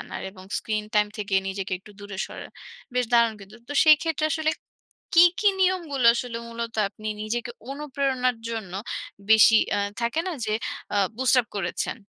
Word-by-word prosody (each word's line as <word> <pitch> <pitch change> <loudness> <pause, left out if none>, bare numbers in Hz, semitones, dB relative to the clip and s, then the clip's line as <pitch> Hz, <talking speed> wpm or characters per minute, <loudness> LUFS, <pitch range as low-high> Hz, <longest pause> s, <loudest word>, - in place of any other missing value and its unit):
আনার, - - -7
এবং 185 -1 -14
screen 215 -1 -2
time 210 0 +4
থেকে 200 -2 -2
নিজেকে 195 0 -4
একটু 210 - -16
দূরে 205 -1 -8
সরার। - - -9 0.4
বেশ 250 0 +2
দারুণ 235 -1 +5
কিন্তু। 200 +3 -13
তো - - -4
সেই 310 -1 +8
ক্ষেত্রে 320 -2 -1
আসলে 315 0 +1 0.6
কী, 340 +1 +9 0.2
কী 420 - +5
নিয়মগুলো 335 -9 +1
আসলে 235 -1 -3
মূলত 235 0 -5
আপনি 215 +1 -8
নিজেকে 235 +2 -3 0.2
অনুপ্রেরণার 275 -3 -1
জন্য 220 -6 -5 0.6
বেশি 220 0 +8 0.2
আ - - +1 0.2
থাকে 235 +7 0
না, - - -2
যে 215 - -1 0.4
আ - - +3 0.2
বুস্ট 260 0 +3
আপ 235 - -11
করেছেন? 175 -3 -2
235 Hz, 170 wpm, -25 LUFS, 210-275 Hz, 0.6 s, কী